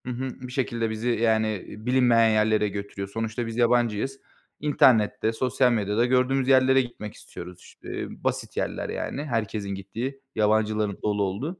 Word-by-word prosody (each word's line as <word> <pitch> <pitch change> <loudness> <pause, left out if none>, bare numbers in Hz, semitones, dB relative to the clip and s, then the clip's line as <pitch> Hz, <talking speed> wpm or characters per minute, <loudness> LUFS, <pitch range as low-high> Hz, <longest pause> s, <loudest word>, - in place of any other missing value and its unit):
Hı 125 - -3
hı. 130 +1 -5
Bir - - -10
şekilde 120 -3 -1
bizi 110 +2 -3
yani, 110 -1 +2
eee, 105 +1 -6
bilinmeyen 120 -3 +4
yerlere 110 -1 +2
götürüyor. 100 0 -5
Sonuçta 115 +3 -3
biz 115 0 -6
yabancıyız. 120 +2 +1 0.4
İnternette, 115 -7 +3
sosyal 125 +1 +2
medyada 105 +1 +1
gördüğümüz 130 +1 +2
yerlere 130 0 +5
gitmek 115 -4 -7
istiyoruz. 90 0 -10
İşte - - -7 0.2
basit - - -2
yerler - - -2
yani. 140 - -4
Herkesin 110 -5 -2
gittiği, 115 +8 -5 0.2
yabancıların 105 -1 +1
dolu 105 -1 +1
olduğu. 130 - -3
115 Hz, 150 wpm, -25 LUFS, 105-125 Hz, 0.4 s, yerlere